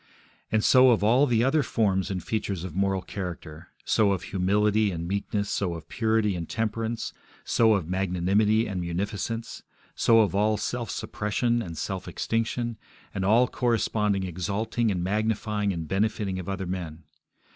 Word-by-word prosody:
And 110 -1 +2
so 130 0 +6
of 115 -4 +3
all 125 +7 +4
the 115 -2 +2
other 135 +4 +3
forms 100 -8 0
and 90 -3 -3
features 100 -5 -2
of 90 -4 -6
moral 95 0 0
character; 85 -4 -7 0.2
so 105 -3 +3
of 95 - -3
humility 105 +3 +2
and 85 -2 -4
meekness, 100 +2 -2
so 90 -4 -1
of 80 - -9
purity 110 -3 +1
and 85 -2 -5
temperance, 115 +1 -2 0.3
so 110 -2 +3
of 95 -6 -2
magnanimity 95 +4 +2
and 95 -3 -3
munificence, 100 +6 -3 0.3
so 115 -1 +4
of 100 -5 +1
all 105 +2 +2
self 120 +2 -3
suppression 120 +3 -1
and 85 -7 -7
self 95 +4 -4
extinction, 115 0 -2 0.3
and 95 - -2
all 115 +6 +4
corresponding 110 -5 0
exalting 100 +6 -1
and 90 -4 -1
magnifying 105 +1 0
and 85 -3 -4
benefiting 100 -1 -1
of 90 - -6
other 95 -1 -3
men. 85 -3 -5
105 Hz, 155 wpm, -26 LUFS, 95-110 Hz, 0.3 s, so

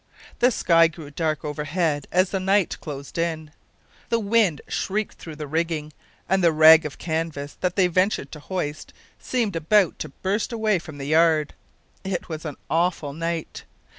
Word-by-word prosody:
The 245 - +5
sky 165 -8 +4
grew 160 -3 -10
dark 155 0 -2
overhead 150 0 -1
as 185 +1 +2
the 195 - 0
night 195 0 +1
closed 140 +1 -7
in, 160 -2 -2 0.6
the 230 - +2
wind 205 -7 +2
shrieked 210 +2 -2
through 160 -2 -9
the 150 0 -6
rigging, 155 0 -2 0.3
and 190 0 +2
the 170 - +5
rag 160 0 +7
of 145 - -11
canvas 160 -3 -3
that 180 -1 0
they 190 - +4
ventured 185 -4 +1
to 150 - -8
hoist 155 -2 -5 0.3
seemed 230 -7 -1
about 175 +3 +2
to - - -4
burst 195 - -2
away 220 -4 +1
from 155 -3 -10
the 140 - -6
yard. 155 0 +3 0.5
It 190 -2 -4
was 160 0 -6
an 150 -3 -5
awful 165 -3 0
night. 165 +1 -4
165 Hz, 165 wpm, -24 LUFS, 155-185 Hz, 0.6 s, rag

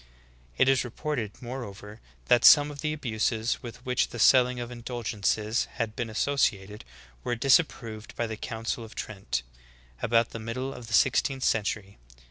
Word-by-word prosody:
It - - +4
is 135 -1 +4
reported, 120 -3 -4
moreover, 110 -4 -8 0.2
that 120 - +4
some 145 -1 +8
of 145 -1 -9
the 150 - -1
abuses 115 -5 -1
with 120 +1 -10
Vv^hich 125 -1 +1
the 120 - -8
selling 125 +2 +5
of 120 0 -5
indulgences 115 -2 -1
had 115 -3 -3
been 120 -2 -3
associated 105 -4 0 0.4
were 120 - -1
disapproved 115 -4 +1
by 120 - -1
the 110 -1 -4
Council 115 +2 -4
of 110 - -12
Trent, 95 - -4 0.6
about 115 0 +2
the 115 - -6
middle 130 +4 -4
of 120 -2 -10
the 115 - -7
sixteenth 135 +3 +2
century. 105 - -1
115 Hz, 155 wpm, -27 LUFS, 110-130 Hz, 0.6 s, some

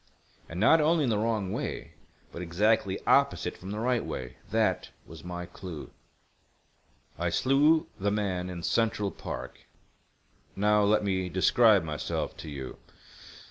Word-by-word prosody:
And 85 - -6
not 155 +10 +6
only 160 +1 +3
in 125 - +1
the 105 - +1
wrong 110 -4 -1
way, - - -4 0.4
but 85 - -7
exactly 95 +3 +1
opposite - - +2
from 95 - -10
the 105 - -4
right 120 +1 +1
way. 65 -1 -6
That - - +1 0.2
was 80 - -12
my 90 0 -5
clue. 90 -3 -9 1.3
"I 85 0 0
slew 145 - +3
the 100 +2 +1
man 95 -3 -1
in 85 -2 -6
Central 110 -2 +1
Park. - - -7 1.0
Now, 105 +1 +3
let 105 +1 +3
me 95 -2 -1
describe 100 +2 +4
myself 75 -2 -3
to 80 - -8
you. 70 -3 -7
100 Hz, 140 wpm, -28 LUFS, 90-110 Hz, 1.3 s, not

